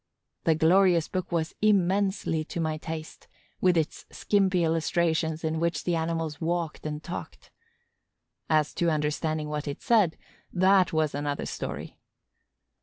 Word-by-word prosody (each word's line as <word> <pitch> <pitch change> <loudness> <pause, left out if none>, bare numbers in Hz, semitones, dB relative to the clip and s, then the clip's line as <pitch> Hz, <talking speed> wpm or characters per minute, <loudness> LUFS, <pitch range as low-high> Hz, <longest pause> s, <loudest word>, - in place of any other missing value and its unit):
The 160 - +4
glorious 170 +1 +4
book 185 -1 -4
was 165 -2 -1
immensely 195 -4 +2
to 170 - -5
my 160 -1 -1
taste, 160 0 -7 0.3
with 180 -2 +4
its 160 -2 -2
skimpy 190 -3 +1
illustrations 165 0 0
in 160 0 -1
which 170 +1 -1
the 175 - 0
animals 160 -2 -2
walked 165 -2 -2
and 150 0 -5
talked. 180 - -8 1.0
As 155 -2 +2
to 170 - +1
understanding 155 0 -1
what 150 0 -4
it 140 - -4
said, 210 -9 +3 0.3
that 185 0 +4
was 155 -2 +1
another 145 0 -2
story! - - -6
165 Hz, 135 wpm, -27 LUFS, 155-180 Hz, 1.0 s, The